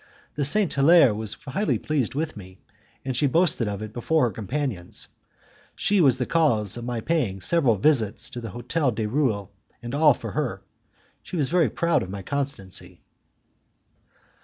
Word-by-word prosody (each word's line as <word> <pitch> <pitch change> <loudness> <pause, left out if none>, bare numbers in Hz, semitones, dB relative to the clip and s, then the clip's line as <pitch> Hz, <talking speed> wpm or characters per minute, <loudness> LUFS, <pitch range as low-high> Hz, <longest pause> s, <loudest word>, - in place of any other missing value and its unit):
The 145 - -1
Saint 195 +6 +4
Hilaire 140 -3 +6
was 110 0 -3
highly 165 +8 -2
pleased 140 -6 -2
with 155 +2 -2
me, 95 -3 -12 0.5
and 130 -2 -2
she 145 +4 +2
boasted 150 -5 +2
of 100 0 -4
it 110 0 -8
before 155 +6 +1
her 120 - +1
companions. 110 -3 -4 0.7
She 200 -2 +2
was 135 -5 +4
the 125 - -1
cause 115 - +1
of 120 - -6
my 120 -1 -3
paying 125 - -1
several 130 - +2
visits 110 -2 +1
to 120 - -6
the 115 - -6
Hotel 130 - -1
du 110 -2 -2
Roule, 110 -6 -1 0.3
and 120 +1 -7
all 150 -2 +5
for - - -7
her; 125 -10 -3 0.6
she - - -8
was 145 -6 +1
very 175 0 +3
proud 170 -1 +1
of 90 - -6
my 100 0 -6
constancy. 135 -8 -4
130 Hz, 170 wpm, -24 LUFS, 110-155 Hz, 0.7 s, Hilaire